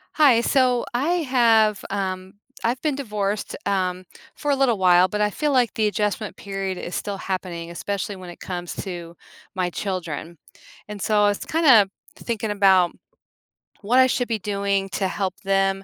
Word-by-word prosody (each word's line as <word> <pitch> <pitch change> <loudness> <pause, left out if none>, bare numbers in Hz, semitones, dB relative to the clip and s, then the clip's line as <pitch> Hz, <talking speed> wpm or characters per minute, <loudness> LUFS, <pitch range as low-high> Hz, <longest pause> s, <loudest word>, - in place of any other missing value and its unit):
Hi. 270 -7 +5
So 250 -1 +2
I 265 +7 0 0.2
have, 225 -5 +3
um 190 -1 -4 0.3
I've 240 +2 0
been 300 -3 0
divorced, 210 -6 -3
um, 185 -2 -1 0.3
for 290 - -1
a - - +3
little 265 -5 +2
while, 180 -1 +5
but 210 - -3
I 210 - +3
feel 300 +7 -1
like 250 -4 +2
the 215 -1 +1
adjustment 210 0 -2
period 195 -2 -4
is 175 - -6
still 200 -1 -3
happening, 180 -3 -4
especially 200 +3 -4
when 185 -1 -10
it 175 - -11
comes 175 -2 -5
to 175 -3 -7 0.4
my 180 -1 0
children. 170 -4 -4 0.5
And 210 -1 -7
so 210 0 +2
I 205 - +5
was 205 - -2
kinda 265 -12 +5 0.3
thinking 220 -2 -3
about 190 -4 +4 0.9
what 235 +5 +3
I 260 - +7
should 245 -1 0
be 225 -2 -1
doing 200 -1 -1
to 195 -1 -1
help 190 -1 -2
them 195 0 +1
200 Hz, 170 wpm, -23 LUFS, 185-230 Hz, 0.9 s, I